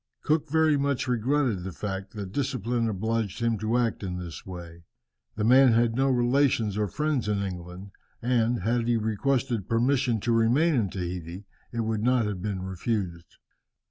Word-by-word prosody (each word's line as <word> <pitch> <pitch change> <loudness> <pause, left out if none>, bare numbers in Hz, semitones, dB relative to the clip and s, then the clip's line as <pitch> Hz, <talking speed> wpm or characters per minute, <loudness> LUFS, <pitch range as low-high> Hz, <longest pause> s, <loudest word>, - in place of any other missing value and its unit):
Cook 155 0 +1
very 160 -1 +3
much 140 -2 0
regretted 125 -4 +1
the 95 - -5
fact 95 +1 -5
that 100 -3 -5
discipline 120 -3 -1
obliged 110 +1 -2
him 115 -2 0
to 110 +3 0
act 120 -2 0
in 90 -3 -4
this 90 0 -8
way. 85 -2 -9 0.5
The 105 - -2
man 130 +2 +6
had 115 0 +2
no 135 +2 +2
relations 120 -4 +2
or 105 0 0
friends 150 - -1
in 100 -1 0
England, 90 +1 -7 0.3
and, 120 -1 +1
had 115 +3 0
he 120 -1 +3
requested 115 0 -1
permission 125 0 +2
to 120 - 0
remain 120 +9 +3
in 115 -8 +1
Tahiti, 90 +1 -5 0.3
it 115 - -2
would 110 -1 -1
not 125 0 +2
have 100 -3 -3
been 95 -2 -3
refused. 95 -2 -4
115 Hz, 170 wpm, -27 LUFS, 95-125 Hz, 0.5 s, man